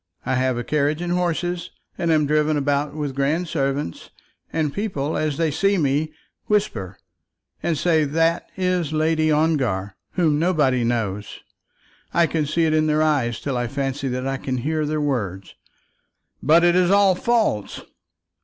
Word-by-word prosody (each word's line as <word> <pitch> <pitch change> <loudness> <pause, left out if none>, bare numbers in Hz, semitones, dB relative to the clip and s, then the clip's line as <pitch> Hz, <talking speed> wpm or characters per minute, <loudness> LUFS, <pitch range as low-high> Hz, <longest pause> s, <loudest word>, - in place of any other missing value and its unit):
I - - 0
have 130 -1 +1
a 120 - -2
carriage 150 +3 0
and 175 0 -2
horses, 175 0 -1 0.3
and 170 - -2
am 155 -2 +3
driven 150 +1 +2
about 145 +1 0
with 145 -3 -3
grand 145 +6 0
servants; 140 - -2 0.4
and 155 -3 -1
people, 160 -8 -2
as 150 -2 -1
they 165 -2 +1
see 195 +7 +2
me, 150 0 0 0.4
whisper 110 - -1 0.6
and 165 -3 0
say 160 +1 +2
that 165 +3 0
is 180 -4 0
Lady 155 0 +2
Ongar, 130 -11 0 0.2
whom 155 -5 +2
nobody 150 -8 +2
knows. 110 -4 -2 0.7
I 170 - +5
can 155 -2 -1
see 165 +3 +1
it 155 - +1
in 155 0 +2
their 155 0 +2
eyes 135 -7 +1
till 140 -2 -3
I 120 0 -1
fancy 135 +1 -3
that 125 0 -3
I 135 0 -1
can 130 -1 -3
hear 155 +4 -1
their 155 0 -1
words." 105 -10 -2 0.9
"But 165 +4 +5
it 175 0 +4
is 180 -1 +3
all 200 -1 +5
false." 215 - 0
150 Hz, 165 wpm, -22 LUFS, 135-165 Hz, 0.9 s, I